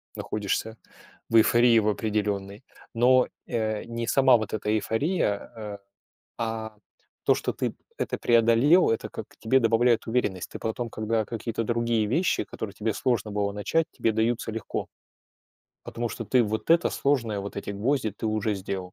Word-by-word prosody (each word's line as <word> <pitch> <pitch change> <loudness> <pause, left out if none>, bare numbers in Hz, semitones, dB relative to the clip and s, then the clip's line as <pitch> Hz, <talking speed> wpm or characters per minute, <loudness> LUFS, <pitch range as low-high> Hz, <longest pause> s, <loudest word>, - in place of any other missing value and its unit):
находишься 105 +2 -3 0.5
в - - 0
эйфории 120 +1 +5
в 105 - 0
определенной. 105 -1 -2 0.3
Но, 125 +2 +5 0.2
э, 110 -3 -1
не 115 0 -5
сама 130 0 +5
вот 110 -2 -5
эта 105 -1 -2
эйфория, 110 - 0
э, 105 -2 -6 0.6
а 110 -1 -4 0.5
то, - - +5
что - - -2
ты - - -3 0.2
это - - -2
преодолел, 120 +9 +4
это 115 - -1
как - - -7
тебе 115 +4 +3
добавляет 115 0 +3
уверенность. 110 -6 -1
Ты - - -7
потом, 115 +2 -3
когда 110 +1 -1
какие-то 115 +1 -4
другие 115 -1 +1
вещи, 165 - +1
которые 100 -3 -7
тебе 110 0 -1
сложно 115 -5 0
было 100 -1 -1
начать, 130 +11 0
тебе 115 - 0
даются 110 +1 0
легко. 110 -2 -4 1.0
Потому 120 0 -4
что - - -6
ты 125 -2 +3
вот 110 +6 -3
это 170 +1 +5
сложное, 120 -7 0
вот 100 +1 -7
эти 100 - -4
гвозди 110 +3 0
ты 105 - -5
уже 110 -1 0
сделал. 95 -1 -5
110 Hz, 160 wpm, -26 LUFS, 105-120 Hz, 1.0 s, эйфории